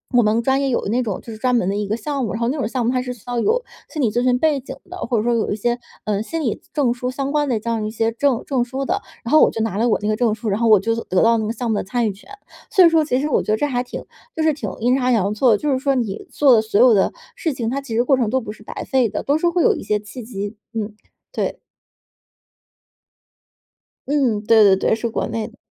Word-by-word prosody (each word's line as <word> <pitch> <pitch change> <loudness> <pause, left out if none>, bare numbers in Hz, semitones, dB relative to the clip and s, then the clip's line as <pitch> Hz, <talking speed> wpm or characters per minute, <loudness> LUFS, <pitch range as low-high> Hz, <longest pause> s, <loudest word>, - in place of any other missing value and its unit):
我 245 - +7
们 215 +2 +2
专 265 +3 +1
业 275 - 0
有 240 - -1
那 240 +4 +1
种 205 -5 -3
就 230 - -10
是 - - -9
专 250 +1 +1
门 235 - +1
的 200 - -1
一 205 -1 -2
个 215 - 0
项 275 +3 -3
目， - - -3
然 225 - -4
后 235 - +1
那 295 - -2
种 245 - -1
项 240 0 -2
目 240 - +2
它 255 -1 0
是 250 0 -4
需 235 - -18
要 245 -1 -1
有 470 - +1 0.3
心 305 - -4
理 230 -5 +2
咨 240 +2 0
询 250 -1 +3
背 300 -1 +2
景 265 +1 -8
的， 360 - -7
或 240 - -1
者 215 - +1
说 240 0 +1
有 230 - 0
一 205 - 0
些， 240 +3 -1 0.3
呃， 210 -1 0
心 330 +6 -4
理 235 -8 -2
证 270 -6 +2
书 250 +1 -4
相 275 +1 -3
关 295 -1 +1
的 225 -3 +1
这 230 - -5
样 225 -2 -1
一 215 - -3
些 225 0 0
证 250 0 0
证 260 -4 0
书 265 +3 -4
的， - - -1 0.2
然 235 - -5
后 310 - +6
我 - - +6
就 225 - -3
拿 220 -3 -1
了 235 +3 +2
我 215 - +2
那 210 - -2
个 215 - +1
证 230 -1 +1
书， 220 0 -4
然 200 +3 0
后 235 - +2
我 215 - +7
就 225 +4 0
得 185 - +1
到 230 0 +4
那 220 - -1
个 225 - -2
项 235 -1 -3
目 210 - +1
的 - - -1
参 230 +3 -1
与 - - 0
权。 195 - -18 0.4
所 375 - +5
以 - - +7
说 325 -1 +3
其 255 -3 0
实 295 - -1
我 - - +2
觉 - - -2
得 215 - +2
这 290 - 0
还 250 -3 -1
挺 245 - -7 0.3
就 315 - -1
是 315 - +3
挺 295 - -5
阴 245 +3 +2
差 255 -1 +1
阳 205 -3 +2
错 245 +3 +3
的， 210 - +4
就 295 +3 -1
是 260 - +1
说 275 0 +1
你 235 - -3
做 275 -2 +5
的 220 - +4
所 215 -2 0
有 245 -1 +7
的 195 - +2 0.2
事 325 - -2
情， 230 -3 -3
它 275 +2 -2
其 230 -5 -6
实 235 - +3
过 265 +1 +3
程 235 -4 0
都 260 +3 0
不 215 - -6
是 215 0 -14
白 - - -7
费 255 -5 +2
的， 210 - -4
都 285 +2 +2
是 345 +2 +2
会 340 -1 +1
有 - - +4
一 - - -6
些 210 0 0
契 220 +4 -9
机。 205 -2 -5 0.2
嗯， 215 -1 -4 0.4
对。 - - -3 2.5
嗯， 265 -8 +1
对 225 -1 +6
对 200 -2 +6
对， 220 - +1
是 230 +1 -3
国 - - -2
内 225 -1 -3
的。 240 - -22
240 Hz, 325 characters per minute, -20 LUFS, 220-265 Hz, 2.5 s, 我